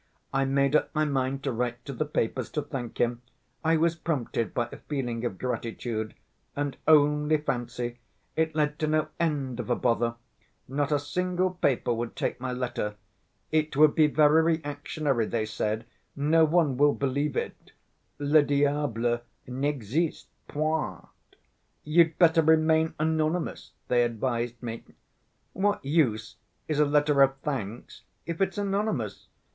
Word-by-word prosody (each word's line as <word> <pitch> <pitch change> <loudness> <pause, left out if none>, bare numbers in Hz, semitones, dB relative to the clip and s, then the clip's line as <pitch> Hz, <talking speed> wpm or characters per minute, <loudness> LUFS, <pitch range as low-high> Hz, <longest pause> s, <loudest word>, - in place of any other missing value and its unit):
I 135 0 +2
made 140 +1 +2
up - - +3
my 155 0 +2
mind 135 -1 -1
to 135 - 0
write 120 0 -3
to 140 - -5
the 155 +3 -2
papers 130 -3 -1
to 150 - -1
thank 125 -5 -6
him, 120 0 +1 0.4
I 165 0 +3
was 165 +1 +2
prompted 130 - -2
by 120 -1 -1
a - - -8
feeling 125 -5 -3
of 110 -6 -2
gratitude, 115 -2 -3 0.4
and 145 -1 -2
only 150 0 +5
fancy, 120 -4 -3 0.4
it 160 -1 0
led 150 -1 0
to 155 - 0
no 155 0 +1
end 140 -7 -1
of 120 - -4
a 120 - +3
bother: 115 -1 +1 0.5
not 140 +2 -1
a 145 - +4
single 180 +5 -1
paper 140 -9 +1
would 115 0 -4
take - - -2
my 130 -1 -2
letter. 120 -4 -3 0.6
'It 155 -2 0
would 150 0 +6
be 155 -2 +5
very 150 +1 +5
reactionary,' 145 -5 -1
they 110 -2 -1
said, 110 +1 -2 0.3
'no 155 +3 +4
one 155 -5 +2
will 145 +1 +4
believe 140 +2 -1
it. - - -5 0.5
Le 145 +2 +4
diable 140 -5 +1 0.3
n'existe 140 +3 -1 0.2
point. 155 +1 -2 0.8
You'd 165 +1 +3
better 165 -2 +5
remain 160 0 +3
anonymous,' 160 +2 -1
they 120 -1 +3
advised 120 0 -2
me. 115 -1 -5 0.7
What 205 -4 0
use 135 -9 +1 0.3
is 155 -2 -1
a 150 - +6
letter 145 -1 +3
of 135 0 +4
thanks 120 -6 -5 0.2
if 170 +2 -4
it's 195 - +1
anonymous? 195 - -2
145 Hz, 150 wpm, -27 LUFS, 120-155 Hz, 0.8 s, would